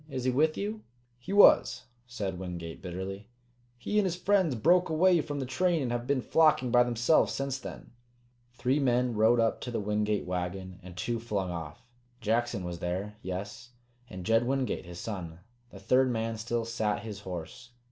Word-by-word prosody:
Is 130 -3 -4
he 130 - +2
with 155 +5 +2
you?" 215 +2 -3 0.4
"He 125 - -8
was," 200 -10 +6 0.2
said 100 -7 -4
Wingate 85 -3 -6
bitterly. 95 +3 -6 0.5
"He 210 +12 0
and 205 - +2
his 175 - -2
friends 180 -5 +2
broke 175 +9 +3
away 170 +2 +4
from 145 -2 -5
the 135 - -2
train 170 +6 +1
and 120 - -2
have 120 0 -3
been 140 -3 +1
flocking 155 -6 +3
by 120 0 +6
themselves 120 +5 +3
since 135 -1 -2
then." - - -9 0.6
Three 130 +4 +1
men 125 -2 +2
rode 110 +2 +4
up 115 -1 +1
to - - -5
the 120 - -2
Wingate 105 0 0
wagon, 90 +1 -4
and 90 -1 -12
two 115 +5 -2
flung 100 -5 -2
off. 85 +6 -7 0.3
Jackson 115 -2 0
was 90 -1 -5
there, 95 +5 -3
yes, 100 +6 -6 0.4
and 90 -1 -8
Jed 115 +3 +3
Wingate, 130 -8 -1
his 90 -1 -9
son. 90 -7 -6 0.3
The 95 - -12
third 130 +6 +3
man 115 -1 -1
still 115 +1 -2
sat 110 -3 -1
his 105 -3 -6
horse. 95 +4 -8
115 Hz, 180 wpm, -29 LUFS, 95-130 Hz, 0.6 s, was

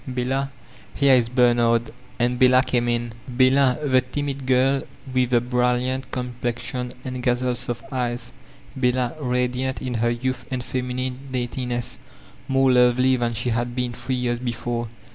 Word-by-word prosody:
Bella. 130 +2 -1 0.5
Here 140 -1 +5
is 120 -2 +4
Bemard. 120 -2 +3 0.3
Aad 125 +1 +1
Bella 130 0 +6
came 120 -2 0
in. 120 -1 -1
Bella, 130 +1 +4
the 130 -2 +4
timid 135 +1 -4
girl 135 +1 +3 0.3
with 130 -1 +2
the 120 -1 +4
brilliant 125 +1 0
complexion 125 0 -3
and 130 -1 -4
gazelle 125 0 +1
soft 120 -1 -4
eyes, 120 -1 -2 0.4
Bella 125 -1 +1
radiant 125 0 -1
in 130 -1 -4
her 120 0 +1
youth 120 +1 -2
and 130 -2 -3
feminine 125 0 -3
daintiness, 120 -1 -3 0.5
more 135 0 +3
lovefy 125 +1 +4
than 120 -1 -1
she 115 +2 -1
had 120 +1 -1
been 125 -1 -1
three 125 +2 -3
years 120 -1 -1
before. 120 -1 -3
125 Hz, 145 wpm, -23 LUFS, 120-130 Hz, 0.5 s, Bella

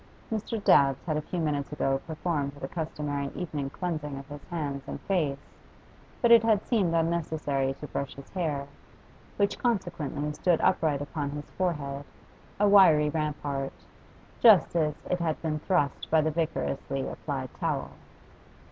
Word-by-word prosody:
Mr. 220 +1 -2
Dabbs 135 -1 +4
had 155 -3 0
a 155 - 0
few 175 +3 -4
minutes 150 -3 -1
ago 135 -2 0
performed 155 -3 -2
the 145 -2 -6
customary 145 -3 -3
evening 150 -6 -3
cleansing 155 -4 -4
of 135 0 -9
his 145 0 -8
hands 145 -5 -3
and - - -5
face, 155 -8 0 0.9
but 235 - +5
it 230 -1 +9
had 220 -2 +2
seemed 190 -9 +2
unnecessary 155 -5 0
to 150 - -8
brush 140 -2 -4
his 140 0 -11
hair, 155 -7 -1 0.7
which 200 -1 +1
consequently 170 - -1
stood 175 +1 +2
upright 145 -3 +2
upon 145 -1 -3
his 145 +1 -7
forehead, 145 -6 -2 0.6
a 205 - +5
wiry 165 -7 +7
rampart, 145 -3 -2 0.7
just 210 -8 +6
as 155 -3 +2
it 180 - 0
had 160 -2 -1
been 155 -1 -1
thrust 150 -4 0
by 160 - +5
the 155 0 +1
vigorously 140 -4 -2
applied 135 -4 -5
towel. - - -1
150 Hz, 150 wpm, -28 LUFS, 140-175 Hz, 0.9 s, it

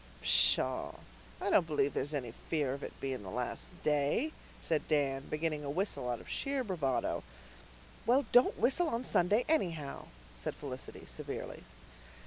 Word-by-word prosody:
"Pshaw, - - +4 0.5
I - - -1
don't 165 - +5
believe 145 -3 +1
there's 145 +3 -1
any 125 -5 -3 0.2
fear 145 -5 +1
of 140 - -6
it - - -7
being 130 -3 -3
the 95 - -7
last 125 - -3
day," 150 - +2 0.3
said 160 -2 -1
Dan, 140 -3 +1
beginning 155 -1 -1
a 140 - -4
whistle 145 -6 -1
out 120 - -1
of - - -13
sheer 275 -2 -1
bravado. 155 - 0 0.9
"Well, 260 +4 +4
don't 245 +1 +6
whistle 275 +9 +3
on 235 -1 -1
Sunday 205 +6 +3
anyhow," 165 - 0 0.3
said - - -4
Felicity 130 -3 -7
severely. - - -6
150 Hz, 150 wpm, -33 LUFS, 135-210 Hz, 0.9 s, don't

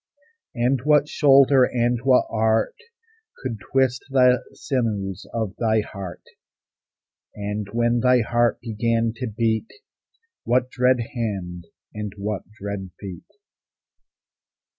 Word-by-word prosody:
And 125 +1 +1
what 150 0 +4
shoulder 135 -2 +5
and 120 -1 +1
what 130 -1 +4
art 110 0 +1 0.6
Could 120 -5 -5
twist 130 +2 0
the 125 -2 +4
sinews 105 - -3
of 110 -4 -3
thy 110 -2 +2
heart? 100 -4 -8 1.1
And, 105 0 -4
when 120 +1 +1
thy 125 0 +4
heart 120 +1 +1
began 115 0 0
to 125 - -3
beat, 110 - -1 0.7
What 125 +1 +1
dread 125 0 +2
hand 95 -7 -4 0.3
and 105 -2 -5
what 100 -1 -4
dread 100 -3 -6
feet? 95 -4 -9
115 Hz, 110 wpm, -23 LUFS, 105-125 Hz, 1.1 s, shoulder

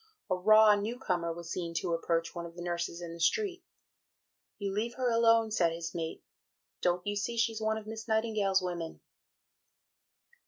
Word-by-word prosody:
A - - +4
raw 215 +3 +7
new 210 +4 -2
comer 175 -8 -1
was 170 0 -7
seen 170 -2 -3
to 170 - -1
approach 165 0 0
one 170 -1 -5
of 170 - -14
the 175 - -7
nurses 175 0 -3
in 165 -1 -6
the 170 - -10
street. 370 - +1 0.9
"You 200 -2 -3
leave 230 +4 -2
her 255 -2 0
alone," 230 -1 +4
said 170 -5 +3
his 165 -1 -5
mate, 165 -1 -4 0.6
"don't 180 0 +1
you 205 0 -1
see 235 +3 -2
she's 225 -1 +1
one 220 0 +1
of 220 - -7
Miss 220 +1 -7
Nightingale's 215 -4 +1
women?" 170 -2 -4
195 Hz, 180 wpm, -31 LUFS, 170-220 Hz, 0.9 s, raw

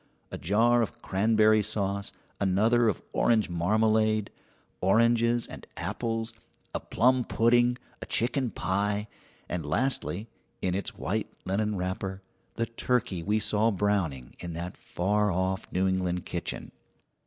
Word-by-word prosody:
A - - -4
jar 115 +7 +3
of 115 - -3
cranberry 110 +2 +4
sauce, 100 -1 -1 0.3
another 110 +5 +3
of 100 - -3
orange 110 -6 +2
marmalade, 110 +4 +2 0.5
oranges 115 +4 +3
and - - -10
apples, 115 -1 -3 0.4
a - - -1
plum 125 +1 +2
pudding, 120 +2 +3 0.2
a - - -6
chicken 125 +2 0
pie, 105 +1 -1 0.4
and 90 -2 -3
lastly, 105 - -1 0.3
in 90 - -1
its 100 +2 -3
white - - -2
linen 105 +3 0
wrapper, 95 +1 -3 0.3
the 115 - 0
turkey 115 -5 -1
we 105 +6 +1
saw 110 +1 +3
browning 95 - -1
in 85 -1 -6
that 85 +2 -5
far 105 +3 0
off 95 +1 -1
New 95 +1 +1
England 90 -2 -1
kitchen. - - -4
105 Hz, 130 wpm, -28 LUFS, 95-115 Hz, 0.5 s, cranberry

